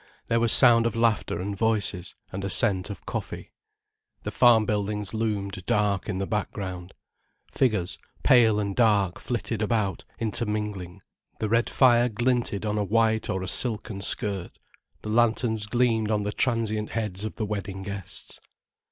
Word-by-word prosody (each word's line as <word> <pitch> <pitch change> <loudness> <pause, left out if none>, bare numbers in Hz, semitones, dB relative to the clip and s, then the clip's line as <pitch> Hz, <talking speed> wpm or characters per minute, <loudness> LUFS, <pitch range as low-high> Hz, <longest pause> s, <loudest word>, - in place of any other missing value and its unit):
There 115 0 +2
was 115 -1 +3
sound 115 -3 +7
of 115 - -4
laughter 115 -6 0
and 100 +2 -4
voices, 105 -4 -1 0.2
and 95 +1 -5
a 100 - -2
scent 95 0 +4
of 100 - -9
coffee. - - -6 0.7
The - - -4
farm 120 -3 +5
buildings 105 0 -2
loomed 100 -4 -3
dark 105 -1 0
in 95 - -2
the 95 - -2
background. 95 -3 -4 0.6
Figures, 105 -9 0 0.2
pale 115 -4 +5
and 100 -2 -3
dark, 105 -6 +2
flitted 115 -2 -3
about, 105 -4 -1
intermingling. 105 -5 -3 0.3
The 110 - -2
red 115 +2 +2
fire 120 -2 +4
glinted 120 -2 -1
on 105 0 -1
a - - +1
white 110 +1 +1
or 95 0 -2
a - - -5
silken 105 -2 -1
skirt, 100 -2 -3 0.5
the 105 - -5
lanterns 110 -1 +1
gleamed 115 -2 +1
on 105 -1 0
the 105 - -2
transient 110 -3 -1
heads 105 -4 -3
of 110 - -5
the 110 - -3
wedding 100 -2 -5
guests. 100 -2 -7
105 Hz, 155 wpm, -26 LUFS, 100-115 Hz, 0.7 s, sound